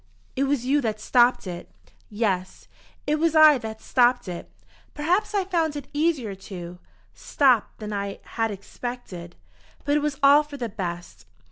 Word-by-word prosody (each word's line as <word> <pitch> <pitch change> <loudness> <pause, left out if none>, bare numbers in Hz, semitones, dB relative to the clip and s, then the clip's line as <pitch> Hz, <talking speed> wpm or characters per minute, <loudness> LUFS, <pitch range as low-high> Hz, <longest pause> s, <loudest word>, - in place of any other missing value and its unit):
It 275 - +1
was 270 -3 0
you 285 +3 +2
that 215 -3 -2
stopped 240 +2 +3
it." 175 -1 -7 0.4
"Yes, 200 -4 -2 0.4
it 300 +1 0
was 325 0 +1
I 310 -3 +8
that 220 -1 -7
stopped 245 -2 +2
it. 175 -1 -7 0.5
Perhaps 365 +8 0
I 390 -2 +1
found 330 -5 0
it 285 -2 -6
easier 295 -8 0
to 180 -2 -9 0.3
stop 255 -6 +2
than 210 -1 -6
I 200 -1 -3
had 225 -1 -2
expected. 200 -4 -7 0.5
But 290 +1 +2
it - - 0
was 295 -2 -2
all 285 +2 +7
for 295 -1 -9
the 240 -4 -4
best. 175 - -6
245 Hz, 160 wpm, -24 LUFS, 200-295 Hz, 0.5 s, I